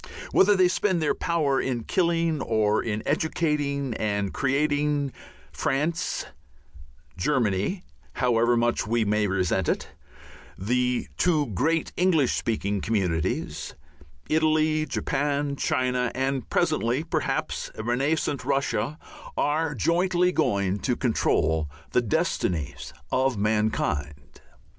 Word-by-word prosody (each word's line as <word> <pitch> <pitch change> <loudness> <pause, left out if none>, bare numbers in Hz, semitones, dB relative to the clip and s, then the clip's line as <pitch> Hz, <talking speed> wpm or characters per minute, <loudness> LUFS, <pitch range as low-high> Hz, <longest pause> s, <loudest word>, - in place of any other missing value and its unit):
Whether 205 +1 +5
they 185 -1 +5
spend 185 0 +1
their 155 - +1
power 150 -5 0
in 120 -3 -2
killing 165 -1 +1
or 110 -2 +1
in 110 -1 -3
educating 145 -4 0
and 100 -2 -1
creating, 145 0 0 0.4
France, 165 +6 -1 0.9
Germany, 115 - 0 0.3
however 120 -1 +2
much 120 -3 +1
we 115 0 +1
may 105 0 +1
resent 95 -1 0
it, - - -1 0.7
the 125 +5 0
two 160 -5 +2
great 160 - 0
English 170 -7 +3
speaking 105 -3 -1
communities, 90 -7 -1 0.5
Italy, 155 0 +2
Japan 145 0 -1
China, 125 -2 0
and 135 0 -1
presently 155 -5 +1
perhaps 165 - -2
a 110 - -5
renascent 140 +5 0
Russia, 140 +2 -1 0.4
are 150 0 0
jointly 175 - +2
going 100 - +1
to 125 +2 0
control 80 - +1 0.2
the 125 - +3
destinies 105 - -1 0.2
of 130 -2 +1
mankind. 100 -9 -1
135 Hz, 105 wpm, -26 LUFS, 110-155 Hz, 0.9 s, Whether